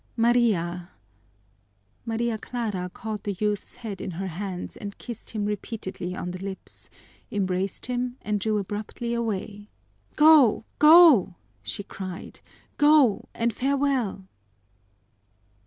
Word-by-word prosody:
Maria 205 -8 +2 0.6
" 100 - -41
Maria 230 0 0
Clara 210 -7 -3
caught 215 0 -5
the 200 -3 -3
youth's 210 -1 -2
head 210 -5 -7
in - - -4
her 185 +2 -4
hands 180 +1 -5
and 200 -1 -8
kissed 235 -3 -8
him 215 -2 -2
repeatedly 205 -3 -4
on 180 -1 -4
the 185 +1 -7
lips, 195 -1 -8 0.4
embraced 190 -1 -1
him, 250 0 -2
and 210 -1 -1
drew 215 +2 0
abruptly 210 +4 -4
away. 210 -2 -3 0.5
"Go, 300 -8 +6
go!" 300 - +7 0.3
she 105 - -6
cried. 190 -2 -8 0.4
"Go, 290 -7 +4
and 235 0 0
farewell!" 265 -7 0
210 Hz, 120 wpm, -26 LUFS, 190-235 Hz, 0.6 s, go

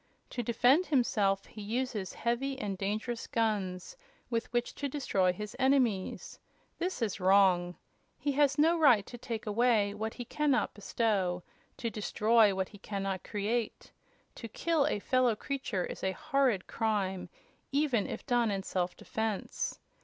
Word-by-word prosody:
To 245 - -2
defend 245 +9 +3
himself 205 -8 +2
he 215 - -10
uses 220 -2 -2
heavy 260 +4 -1
and 205 -7 -3
dangerous 215 +5 -3
guns, 200 -5 -1 0.4
with 230 -1 -1
which 240 0 -1
to 285 - -3
destroy 200 -10 +1
his 210 +3 -7
enemies. 255 -8 +1 0.4
This 360 -8 -1
is 205 -3 -2
wrong. 185 -2 +4 0.4
He 290 - -1
has 280 0 +3
no 325 +3 +4
right 240 -10 +6
to 240 - -10
take 230 -2 -5
away 215 -1 +2
what 220 +2 -4
he 245 - -6
can 300 +5 -1
not 260 - +2
bestow; 195 -4 0 0.3
to 230 - -3
destroy 215 0 +3
what 190 0 -1
he 205 - -14
can 200 -1 -4
not 195 -1 -2
create. 215 +2 -2 0.4
To 230 - -8
kill 305 +5 +1
a 300 - 0
fellow 250 +2 +2
creature 235 -7 -3
is - - -8
a 190 0 +1
horrid 255 -5 +1
crime, 200 -5 -1 0.4
even 275 -7 +1
if - - -6
done 240 -3 +2
in 195 -1 -2
self 180 -2 -2
defense. 220 -2 -3
220 Hz, 155 wpm, -31 LUFS, 195-255 Hz, 0.4 s, right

